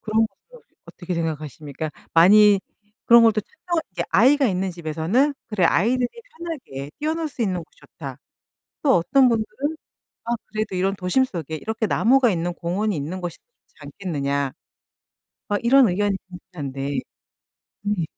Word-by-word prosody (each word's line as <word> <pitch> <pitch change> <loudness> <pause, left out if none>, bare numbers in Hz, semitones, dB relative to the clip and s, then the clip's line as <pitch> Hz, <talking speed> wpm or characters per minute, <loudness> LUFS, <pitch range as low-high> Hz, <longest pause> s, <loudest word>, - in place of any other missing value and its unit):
그런 220 0 +2
것도 - - -20 0.2
어떻게 180 -1 -6
생각하십니까? 155 -2 -4 0.2
많이 200 +4 +7 0.4
그런 235 0 +8
것도 225 -2 +4
특정한 355 - -3
이제 - - -2
아이가 270 +5 +5
있는 190 -2 -1
집에서는 170 - 0
"그래 205 -5 0
아이들이 240 +9 +2 0.3
편하게 255 - -6
뛰어놀 315 +1 -1
수 250 - -4
있는 185 -5 -1
곳이 - - -21
좋다." 135 -4 -10 0.6
또 275 -3 +4
어떤 255 +10 +4
분들은 235 +7 -2 0.5
"아 235 - -2 0.2
그래도 215 -3 -3
이런 195 +2 0
도심 190 +8 +2
속에 160 - -5
이렇게 220 +6 -2
나무가 255 +1 +4
있는 175 -2 -1
공원이 185 +4 -1
있는 155 +6 -4
것이 175 -2 -5
좋지 485 - -43
않겠느냐." 140 -7 -2 1.0
어 205 - +1
이런 255 0 +6
의견이 200 +2 +1
분분한데 140 -6 -5 0.8
네. 205 -4 -1
200 Hz, 330 characters per minute, -23 LUFS, 165-240 Hz, 1.0 s, 그런